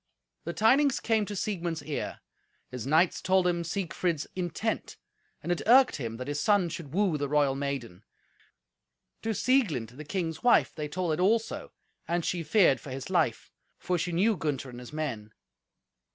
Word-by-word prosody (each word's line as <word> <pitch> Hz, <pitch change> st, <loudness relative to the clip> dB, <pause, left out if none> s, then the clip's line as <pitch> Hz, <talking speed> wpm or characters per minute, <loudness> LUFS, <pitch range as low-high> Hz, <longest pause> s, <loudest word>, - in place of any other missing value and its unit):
The -, -, -3 dB
tidings 265 Hz, +5 st, +4 dB
came 220 Hz, -3 st, +1 dB
to 205 Hz, -, -5 dB
Siegmund's 175 Hz, -6 st, -3 dB
ear. 150 Hz, -1 st, -4 dB, 0.5 s
His 125 Hz, -1 st, -5 dB
knights 160 Hz, +5 st, +3 dB
told 185 Hz, -1 st, +3 dB
him 175 Hz, -1 st, +1 dB
Siegfried's 170 Hz, -2 st, -2 dB
intent, 185 Hz, +5 st, -3 dB, 0.5 s
and 175 Hz, -, -2 dB
it 175 Hz, -, 0 dB
irked 255 Hz, +2 st, +6 dB
him 115 Hz, -5 st, -5 dB
that 125 Hz, +2 st, -6 dB
his 145 Hz, 0 st, -2 dB
son 200 Hz, -5 st, +3 dB
should 155 Hz, -3 st, -7 dB
woo 185 Hz, -3 st, +1 dB
the 145 Hz, -1 st, -2 dB
royal 145 Hz, -2 st, +3 dB
maiden. 135 Hz, -9 st, -4 dB, 1.2 s
To 225 Hz, -1 st, -2 dB
Sieglind, 190 Hz, -, +1 dB
the 150 Hz, -, -7 dB
king's 160 Hz, 0 st, -3 dB
wife, 245 Hz, -, +4 dB
they 150 Hz, -1 st, -4 dB
told 175 Hz, +1 st, -1 dB
it 155 Hz, -, -2 dB
also, 220 Hz, +5 st, +1 dB, 0.4 s
and 170 Hz, 0 st, -1 dB
she 175 Hz, -, -1 dB
feared 165 Hz, -, +4 dB
for 140 Hz, -, -10 dB
his 135 Hz, +6 st, -6 dB
life, 160 Hz, -11 st, 0 dB, 0.3 s
for 180 Hz, -, -1 dB
she 175 Hz, +3 st, -2 dB
knew 200 Hz, +6 st, +2 dB
Gunther 140 Hz, -6 st, -3 dB
and 120 Hz, -, -9 dB
his 125 Hz, -, -10 dB
men. 115 Hz, -9 st, -4 dB
165 Hz, 170 wpm, -28 LUFS, 145-195 Hz, 1.2 s, irked